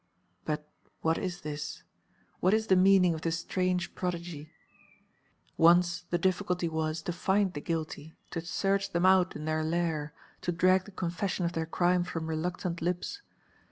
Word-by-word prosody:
But 150 0 -2 0.3
what 160 0 +1
is 180 -2 -4
this, 150 0 -5 0.6
what 185 +4 +4
is 220 0 0
the 190 - +4
meaning 185 -1 +5
of 160 - -5
this 165 0 0
strange 180 +1 -1
prodigy? 170 -4 -4 1.1
Once 175 +1 +4
the 175 - +1
difficulty 180 -1 0
was 160 0 -2
to 175 - -2
find 190 +1 +1
the 145 - -5
guilty, 160 -1 -4 0.2
to 165 - -3
search 195 +3 0
them 170 +1 +2
out 185 -1 +4
in 150 - -5
their 155 0 0
lair, 160 -2 -1 0.3
to 175 - -1
drag 185 +2 +3
the 210 - -11
confession 180 0 -2
of 170 - -1
their 160 -1 -2
crime 175 +2 +2
from 165 -2 -4
reluctant 170 +2 -3
lips. 180 - -2
175 Hz, 160 wpm, -30 LUFS, 160-185 Hz, 1.1 s, meaning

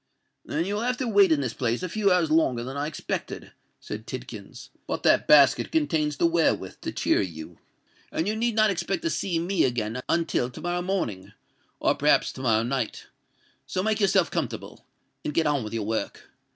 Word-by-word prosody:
"Then 165 +3 -2
you 200 - -2
will 210 - -1
have 250 +1 0
to 255 - -2
wait 200 -5 +5
in 150 -3 +3
this 125 -4 -2
place 120 +4 -1
a - - -1
few 200 +2 +1
hours 175 -4 +2
longer 130 -7 +2
than 130 +2 -6
I 145 +1 -2
expected," 155 - -5 0.3
said 110 +1 -7
Tidkins. 120 -6 -8 0.2
"But - - -3
that - - +4
basket 145 -3 +5
contains 160 - 0
the - - +2
wherewith 170 -1 +1
to - - -4
cheer - - +1
you, 80 -5 -7 0.5
and 165 - -1
you 215 - 0
need 230 0 0
not 215 -1 +4
expect 175 0 -2
to 165 - 0
see 175 +3 -1
me 175 +1 +1
again 120 -1 -1
until 165 -7 +1
to - - -11
morrow 175 0 -2
morning, 175 - -3 0.5
or - - +3
perhaps - - +3
to - - -8
morrow 115 -3 +2
night. 125 -2 -3 0.6
So 185 - -2
make 215 0 +1
yourself 200 -3 +3
comfortable—and 150 - -6
get 165 - +3
on 145 -4 +1
with 105 - -6
your 115 -2 -3
work. 110 -1 -4
155 Hz, 195 wpm, -26 LUFS, 120-190 Hz, 0.6 s, wait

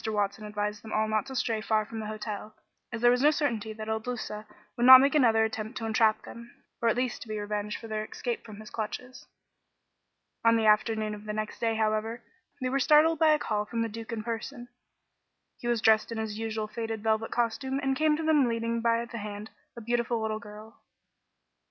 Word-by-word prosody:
Watson 205 0 -1
advised 210 0 -3
them 220 - -9
all 215 0 +1
not 215 +4 0
to 265 - -7
stray 225 -3 0
far 215 0 +1
from 225 +1 -7
the 215 - -5
hotel, 215 0 -6 0.4
as 230 -1 -5
there 240 0 +6
was 250 +1 +2
no 295 - +6
certainty 240 -8 -1
that 215 0 -7
Il 220 0 -1
Duca 220 -2 -5 0.3
would 240 +1 +2
not 260 0 +12
make 275 +1 +3
another 230 -7 +4
attempt 220 +2 -5
to 225 - -4
entrap 220 -1 +2
them, 235 +1 -11 0.3
or 230 - +3
at 225 - +2
least 250 0 -2
to - - -9
be 215 0 -4
revenged 210 0 -3
for 225 - -9
their 215 -1 -3
escape 235 +2 -4
from 215 -2 -11
his 215 - -11
clutches. 250 +3 -6 1.2
On 230 0 +5
the 220 - +1
afternoon 215 0 +2
of 210 0 -9
the 210 - -4
next 215 0 -4
day, 225 -1 0
however, 220 +2 -1 0.4
they 255 -1 -1
were 275 +2 0
startled 305 +4 +5
by 320 - +5
a 305 - +4
call 210 -7 -1
from 230 +1 -2
the 230 - -2
Duke 225 +2 -8
in 220 -2 -4
person. 240 +2 -5 0.9
He 240 - -5
was 240 -2 +1
dressed 220 +1 +4
in 230 - -4
his 220 -1 -4
usual 220 -1 -3
faded 225 0 -5
velvet 220 0 +1
costume 240 +3 -1
and 270 -1 0
came 305 +1 +2
to 320 - -3
them 305 -5 +4
leading 230 0 -1
by 230 0 +1
the 235 -1 -7
hand 210 +1 -7 0.3
a - - -6
beautiful 235 +1 0
little 220 0 -2
girl. 215 0 -13
225 Hz, 220 wpm, -28 LUFS, 215-240 Hz, 1.2 s, not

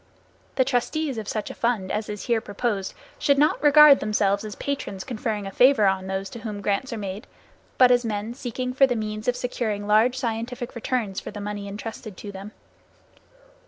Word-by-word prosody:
The 260 - +3
trustees 270 +1 -1
of 215 - -7
such 215 -2 -3
a - - -7
fund 230 -6 -1
as 210 0 -2
is 210 -1 -5
here 235 -2 +1
proposed 205 -2 -3 0.2
should 280 -1 +3
not 300 +2 +3
regard 295 -1 +8
themselves 205 -1 +1
as 215 -1 -6
patrons 275 -9 -4
conferring 220 -4 -3
a 195 - -5
favor 250 -1 +5
on 190 -1 +1
those 190 0 -3
to 235 - -8
whom 215 -3 -5
grants 205 +6 -1
are 230 - -3
made, 200 0 -6 0.5
but 250 -1 +7
as 245 0 +4
men 215 0 -3
seeking 250 0 -4
for 270 +1 +5
the 245 - -1
means 215 -1 -4
of 250 - +2
securing 230 -5 -3
large 220 +5 +3
scientific 240 0 -3
returns 235 -4 -2
for - - -8
the 205 - -8
money 205 0 -5
entrusted 210 -1 -7
to 205 - -7
them. 195 +2 -9
220 Hz, 195 wpm, -24 LUFS, 205-250 Hz, 0.5 s, regard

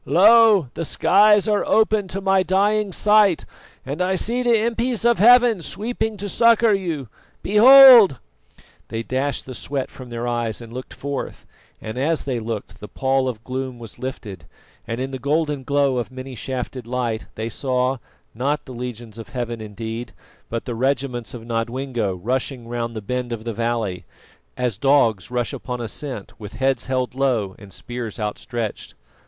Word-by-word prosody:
"Lo! 215 - +5
the 165 - -4
skies 205 +5 +4
are 210 -1 +2
open 215 -2 +2
to 190 +2 -4
my 195 -1 +2
dying 200 +2 +1
sight, 205 -2 +3 0.4
and 140 +6 -4
I 185 +1 +1
see 235 +6 -1
the 240 -1 +3
impis 235 0 -1
of 235 -1 +3
Heaven 240 -2 +6
sweeping 220 - -3
to 205 +1 -5
succour 230 +1 +4
you. 170 -9 -2 0.4
Behold!" 235 - +8 0.7
They 115 0 -4
dashed 130 +3 -2
the 130 - -8
sweat 135 +1 -4
from 130 -2 -11
their 120 0 -4
eyes 120 -2 -2
and 115 -1 -11
looked 130 +1 -8
forth, 140 -1 -5 0.3
and 110 +3 -6
as 155 +4 0
they 130 -4 -2
looked, 110 -2 -6
the 105 - -9
pall 130 +1 0
of 115 -3 -7
gloom 130 0 -5
was 115 -3 -11
lifted, 105 - -7 0.4
and 115 +1 -4
in 130 +1 -3
the 130 - -5
golden 145 +1 -1
glow 140 -1 +1
of 120 - -3
many 130 +1 -8
shafted 125 +1 -5
light, 120 -3 -2
they 110 +1 -4
saw, 130 +2 -1 0.4
not 140 +6 -2
the 130 - -9
legions 120 -2 -7
of 115 - -9
Heaven 120 -3 -4
indeed, 110 +2 -6 0.4
but 115 0 -4
the 125 - -4
regiments 125 -1 -2
of 115 -1 -9
Nodwengo 115 -2 -2
rushing 125 +5 -3
round 115 -1 -4
the 110 - -4
bend 125 +3 -3
of 115 -2 -5
the 115 0 -4
valley, 115 -4 -2 0.5
as 125 -5 -2
dogs 115 - +2
rush 120 -2 -2
upon 125 -2 -5
a 120 - -4
scent, 125 -3 -6
with 105 -2 -9
heads 130 -2 0
held 130 -1 -1
low 125 -8 0
and 100 -1 -13
spears 120 0 -7
outstretched. 110 +1 -5
130 Hz, 170 wpm, -21 LUFS, 115-180 Hz, 0.7 s, Behold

